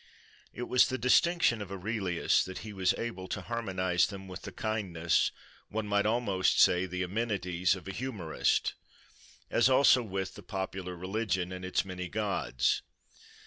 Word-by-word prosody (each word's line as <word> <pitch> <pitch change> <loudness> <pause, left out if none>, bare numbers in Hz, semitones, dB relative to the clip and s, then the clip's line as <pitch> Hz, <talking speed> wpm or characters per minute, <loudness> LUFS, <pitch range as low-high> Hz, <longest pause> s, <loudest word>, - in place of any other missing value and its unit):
It 120 - -6
was 125 0 +4
the 130 - -2
distinction 125 0 +3
of 100 -2 -7
Aurelius 95 -2 0
that 95 0 -6
he 105 - -7
was 95 -2 +1
able 95 -6 -5
to - - -3
harmonise 95 -6 0
them 95 -1 -8
with 95 0 -8
the - - -7
kindness, 90 -7 0 0.4
one 110 0 -2
might 105 0 +2
almost 105 -5 +1
say 90 +1 +5
the 90 +1 -3
amenities, 95 -3 0
of 95 0 -10
a - - -3
humourist, 100 -8 -1 0.8
as 120 +2 +4
also 130 -1 +6
with 95 -4 -4
the - - -11
popular 95 -2 -5
religion 95 0 -2
and 90 0 -6
its 95 0 0
many 90 -1 -5
gods. 100 - 0
95 Hz, 155 wpm, -30 LUFS, 90-110 Hz, 0.8 s, also